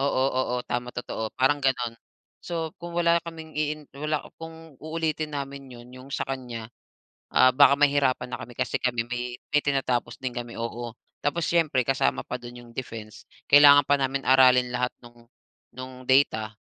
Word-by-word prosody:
oo, 140 - +2 0.3
oo, 125 -1 0
tama, 120 0 -3
totoo, 110 -2 -4
parang 145 +3 +3
gano'n. 125 -3 0 0.5
So, 165 -2 -4
kung 170 0 -7
wala 170 0 +3
kaming 160 -2 -9
iin 150 0 -1
wala 150 +1 -2 0.2
kung 165 -2 -10
uulitin 155 -1 -2
namin 140 -1 -6
'yon, 120 0 -12
'yong 130 +2 -12
sa - - -2
kanya, 125 -4 -5 0.7
ah, 130 - +7
baka 140 +1 +6
mahirapan 140 -3 +2
na - - -4
kami 120 0 -10
kasi - - 0
kami 120 -2 0
may 125 0 -3 0.2
may 150 - +4
tinatapos 125 -4 -1
din 130 -1 -2
kami, 120 -1 -6
oo. 115 +1 -4 0.3
Tapos 155 +3 0
siyempre 155 -6 +2
kasama 135 -1 +1
pa 125 - -3
do'n 120 0 -10
yung 120 - -16
defense, 110 -5 -8 0.2
kailangan 145 0 +8
pa 145 - +5
namin 135 0 -1
aralin 130 -1 +6
lahat 125 0 0
no'ng 120 0 -16 0.5
no'ng 130 0 -9
data, 110 -5 +3
130 Hz, 170 wpm, -26 LUFS, 120-145 Hz, 0.7 s, kailangan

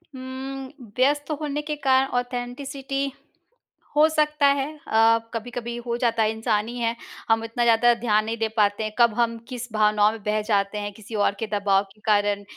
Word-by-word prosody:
हुँ, 260 +1 -6 0.3
व्यस्त 290 +3 +2
होने 295 0 -2
के 300 0 -4
कारण 270 -2 +3
ऑथेन्टिसिटी 270 +3 -3 0.8
हो 305 +1 +6
सकता 300 -2 +1
है। 280 -1 +2 0.2
अ, 225 +1 +4
कभी-कभी 235 +1 -5
हो 235 0 -1
जाता 230 -2 +1
है, 215 - +2
इंसान 220 -1 0
हीं 240 +1 -6
हैं, 230 0 0 0.3
हम 225 0 +3
इतना 230 +1 -1
ज़्यादा 235 +1 +5
ध्यान 215 -2 +2
नहीं 225 +1 -3
दे 225 0 0
पाते 205 0 +2
हैं, 215 - -4
कब 235 -2 +5
हम 230 -1 +1
किस 245 -2 -6
भावनाओं 210 0 +4
में 220 -2 -9
बह 210 0 0
जाते 200 0 +1
हैं, 205 0 -5
किसी 220 +2 -10
और 205 -1 +2
के 225 - -2
दबाव 200 -1 +2
के 215 - -27
कारण। 205 -1 +2
235 Hz, 185 wpm, -24 LUFS, 215-265 Hz, 0.8 s, हो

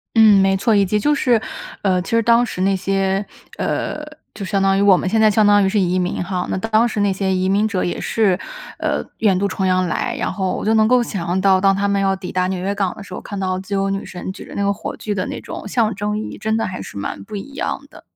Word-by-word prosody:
嗯， 215 -3 +7
没 195 0 +3
错。 220 +2 +2
以 200 -1 +4
及 210 +3 0
就 295 +8 +2
是， 245 -5 +2 0.4
呃， 185 -2 +2
其 - - -8
实 230 0 +3
当 235 +2 +4
时 185 - -5
那 195 +1 +2
些， 195 +1 0 0.3
呃， - - -2 0.3
就 205 - -7
相 195 +1 0
当 195 0 +3
于 - - +2
我 200 -2 +6
们 - - -2
现 220 +4 +1
在 215 - +6
相 215 +1 +3
当 205 0 +5
于 190 - +2
是 210 +1 +1
移 185 -1 +1
民 180 0 -1
哈， 180 0 -3
那 - - -1
当 225 +4 +2
时 215 - -3
那 200 -1 +2
些 190 0 -1
移 185 0 0
民 205 +3 +2
者 195 -4 -1
也 175 - -2
是， 200 -5 +1 0.4
呃， - - -1 0.2
远 200 -4 +3
渡 200 +2 +1
重 190 0 -2
洋 185 0 +2
来， - - -2
然 - - -1
后 190 -2 -1
我 - - -5
就 220 - +3
能 220 -1 +4
够 250 +1 +4
想 195 -6 -4
象 180 +2 0
到 190 -1 +4
当 195 0 +4
他 200 +1 0
们 200 0 +1
要 195 0 +2
抵 190 -1 -7
达 185 0 0
纽 185 -1 -2
约 195 +2 -1
港 195 -3 -1
的 - - -9
时 185 - -11
候， - - -6
看 200 - -6
到 185 -1 -1
自 190 +2 -7
由 195 0 0
女 195 0 -3
神 180 0 -6
举 190 - -10
着 - - -11
那 200 - -1
个 200 0 +2
火 200 - -6
炬 210 - -3
的 185 -2 -2
那 - - -5
种 - - -7
象 220 0 +1
征 210 +2 -2
意 215 - -4
义， - - -9
真 220 +1 -1
的 225 - 0
还 185 0 -5
是 - - -9
蛮 100 0 -5
不 210 - -9
一 275 +8 -7
样 315 +7 -2
的。 - - -15
195 Hz, 315 characters per minute, -19 LUFS, 185-215 Hz, 0.4 s, 嗯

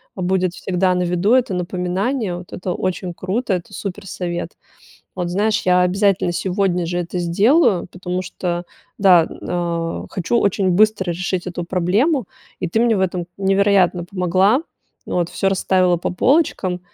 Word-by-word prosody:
а 185 - -6
будет 185 -1 0
всегда 185 0 0
на 180 0 0
виду 180 +5 +1
это 255 -5 +2
напоминание, 180 +4 -2
вот- 175 0 -11
это 180 0 -4
очень 180 -1 -3
круто, 195 +5 -2
это 180 -2 -4
супер 200 0 -6
совет. 175 -2 -4 0.6
Вот, 180 -2 -3
знаешь, 210 +4 +1
я 180 0 +3
обязательно 185 0 +2
сегодня 180 0 0
же 175 +1 -2
это 175 +1 -3
сделаю, 195 - +3
потому 180 0 -3
что, 175 -1 -4 0.3
да, 185 -4 +6
н - - -10
а, 170 -1 -2
хочу 190 +6 0
очень 195 -2 +1
быстро 205 0 +3
решить 180 +1 -2
эту 175 -1 -4
проблему, 195 - +1 0.3
и 180 - -1
ты 220 +7 0
мне 235 -2 +3
в - - 0
этом 180 -2 -1
невероятно 195 -2 +2
помогла, 185 - +2 0.4
вот, 175 -1 -1
всё 195 - 0
расставила 185 -1 +2
по 170 - -3
полочкам, 185 - +1
185 Hz, 160 wpm, -20 LUFS, 175-200 Hz, 0.6 s, да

